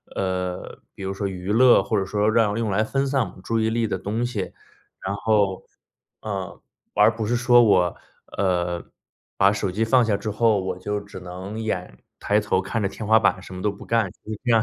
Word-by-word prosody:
呃， 90 Hz, -1 st, -3 dB
比 100 Hz, -, -8 dB
如 95 Hz, 0 st, -2 dB
说 100 Hz, +1 st, -2 dB
娱 95 Hz, 0 st, -4 dB
乐， 120 Hz, -2 st, +6 dB
或 110 Hz, +2 st, 0 dB
者 95 Hz, -, -1 dB
说 105 Hz, +2 st, +1 dB
让 110 Hz, -2 st, +2 dB
用 115 Hz, -3 st, -1 dB
来 105 Hz, +3 st, +2 dB
分 135 Hz, +5 st, 0 dB
散 135 Hz, 0 st, +1 dB
我 -, -, -15 dB
们 95 Hz, -, -15 dB
注 115 Hz, 0 st, 0 dB
意 110 Hz, 0 st, +1 dB
力 115 Hz, 0 st, 0 dB
的 -, -, -2 dB
东 110 Hz, +4 st, -2 dB
西。 110 Hz, -6 st, -4 dB, 0.5 s
然 95 Hz, -, -1 dB
后 100 Hz, -2 st, +1 dB, 0.6 s
呃， 100 Hz, -3 st, -5 dB, 0.3 s
而 115 Hz, -, +5 dB
不 110 Hz, -1 st, -3 dB
是 120 Hz, +3 st, +1 dB
说 120 Hz, 0 st, +5 dB
我， 90 Hz, -6 st, +3 dB, 0.4 s
呃， 90 Hz, -2 st, 0 dB, 0.5 s
把 100 Hz, +1 st, +5 dB
手 100 Hz, -1 st, -2 dB
机 105 Hz, +5 st, 0 dB
放 125 Hz, +2 st, +4 dB
下 110 Hz, -3 st, +1 dB
之 105 Hz, +2 st, -4 dB
后， 110 Hz, 0 st, +3 dB
我 95 Hz, -, -3 dB
就 105 Hz, +2 st, -3 dB
只 100 Hz, -2 st, -10 dB
能 90 Hz, +4 st, -7 dB
眼 95 Hz, -5 st, -4 dB, 0.2 s
抬 105 Hz, +1 st, +2 dB
头 100 Hz, -2 st, 0 dB
看 105 Hz, +4 st, -2 dB
着 100 Hz, -, +1 dB
天 105 Hz, +2 st, -7 dB
花 110 Hz, +1 st, +6 dB
板， 95 Hz, -, +1 dB
什 95 Hz, -, -10 dB
么 90 Hz, -, -6 dB
都 105 Hz, -, +1 dB
不 100 Hz, -, -10 dB
干， 115 Hz, -4 st, +1 dB
其 105 Hz, -, -13 dB
实 105 Hz, -, -6 dB
这 120 Hz, -, -1 dB
样 115 Hz, -1 st, +5 dB
105 Hz, 240 characters per minute, -23 LUFS, 95-110 Hz, 0.6 s, 乐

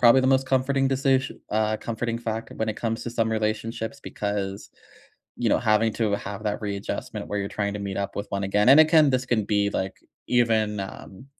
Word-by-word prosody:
probably 125 Hz, +2 st, +7 dB
the 130 Hz, -, +1 dB
most 135 Hz, 0 st, +3 dB
comforting 135 Hz, +1 st, +2 dB
decis 135 Hz, 0 st, +2 dB, 0.2 s
uh, 110 Hz, 0 st, +1 dB
comforting 115 Hz, +1 st, -3 dB
factor 115 Hz, -1 st, -4 dB
when 110 Hz, 0 st, -1 dB
it 105 Hz, -, -2 dB
comes 115 Hz, 0 st, -3 dB
to 120 Hz, -, -4 dB
some 115 Hz, -1 st, 0 dB
relationships 110 Hz, +4 st, -2 dB
because, 100 Hz, -4 st, -4 dB, 0.7 s
you -, -, 0 dB
know, -, -, +3 dB
having 110 Hz, +1 st, +2 dB
to 110 Hz, -3 st, 0 dB
have 100 Hz, +1 st, -5 dB
that 105 Hz, +2 st, -1 dB
readjustment 100 Hz, -1 st, -4 dB
where 105 Hz, -, -2 dB
you're 100 Hz, -, -3 dB
trying 100 Hz, -1 st, -2 dB
to 105 Hz, -, -4 dB
meet 100 Hz, -1 st, -4 dB
up 100 Hz, -, -3 dB
with 100 Hz, -, -3 dB
one 100 Hz, 0 st, -2 dB
again. 105 Hz, +4 st, +2 dB
And, 145 Hz, +3 st, +9 dB
again, 155 Hz, -2 st, +6 dB
this 130 Hz, 0 st, +1 dB
can 110 Hz, -4 st, +1 dB
be, 100 Hz, -1 st, +1 dB
like, 95 Hz, 0 st, -3 dB, 0.3 s
even, 110 Hz, -4 st, +2 dB
um, 95 Hz, +4 st, -9 dB
110 Hz, 205 wpm, -25 LUFS, 105-125 Hz, 0.7 s, And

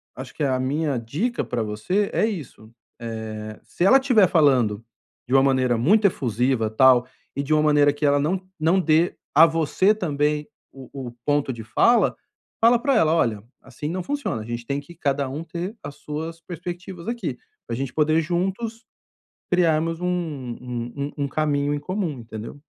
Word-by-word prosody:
acho 130 Hz, 0 st, -8 dB
que 155 Hz, -, -2 dB
a 130 Hz, -2 st, +1 dB
minha 140 Hz, +2 st, -1 dB
dica 150 Hz, -, -2 dB
pra 120 Hz, -, -3 dB
você 110 Hz, -, -1 dB
é -, -, +2 dB
isso. 185 Hz, -, -5 dB, 0.4 s
Eh, 110 Hz, -2 st, -6 dB
se -, -, -4 dB
ela 265 Hz, +8 st, +7 dB
estiver 250 Hz, -8 st, +4 dB
falando 130 Hz, -, +3 dB, 0.4 s
de 125 Hz, -, -3 dB
uma 135 Hz, -, +6 dB
maneira 130 Hz, -3 st, +2 dB
muito 200 Hz, -, +4 dB
efusiva, 125 Hz, -, 0 dB
tal, 125 Hz, +1 st, +5 dB, 0.3 s
e 140 Hz, -, -1 dB
de 150 Hz, +2 st, 0 dB
uma 155 Hz, 0 st, +3 dB
maneira 145 Hz, -1 st, +4 dB
que 145 Hz, +1 st, -2 dB
ela 145 Hz, 0 st, +3 dB
não 175 Hz, +6 st, 0 dB, 0.2 s
não 165 Hz, +5 st, +3 dB
dê 165 Hz, +1 st, +2 dB, 0.2 s
a 160 Hz, +3 st, +9 dB
você 165 Hz, +5 st, +2 dB
também 150 Hz, -5 st, -1 dB, 0.3 s
o 135 Hz, -1 st, -12 dB, 0.2 s
o -, -, -12 dB
ponto 145 Hz, -2 st, +1 dB
de 115 Hz, -1 st, -8 dB
fala, 230 Hz, -, +3 dB, 0.5 s
fala 235 Hz, +1 st, +5 dB
pra 275 Hz, +1 st, +2 dB
ela: 160 Hz, -8 st, +4 dB
"Olha, 110 Hz, -10 st, 0 dB, 0.2 s
assim 135 Hz, +3 st, -7 dB
não 185 Hz, +3 st, -3 dB
funciona, 280 Hz, -, -3 dB
a -, -, -11 dB
gente 120 Hz, 0 st, -4 dB
tem 140 Hz, +3 st, -2 dB
que 170 Hz, +4 st, -15 dB
cada 140 Hz, -4 st, -1 dB
um 145 Hz, +5 st, -5 dB
ter 175 Hz, +5 st, -5 dB
as 140 Hz, -, -7 dB
suas 160 Hz, +2 st, -5 dB
perspectivas 175 Hz, +2 st, -7 dB
aqui, 220 Hz, -, -3 dB, 0.3 s
pra 115 Hz, -, -3 dB
gente 130 Hz, +1 st, -4 dB
poder, 155 Hz, +1 st, +3 dB
juntos, 190 Hz, +7 st, -2 dB, 0.7 s
criarmos 165 Hz, -2 st, +2 dB
um 180 Hz, -, -1 dB
um 125 Hz, -8 st, -4 dB
um 140 Hz, +1 st, -3 dB
um -, -, -2 dB
caminho 145 Hz, 0 st, 0 dB
em 145 Hz, -, -3 dB
comum." 175 Hz, -4 st, -3 dB
Entendeu? 115 Hz, +4 st, -8 dB
150 Hz, 180 wpm, -23 LUFS, 130-175 Hz, 0.7 s, a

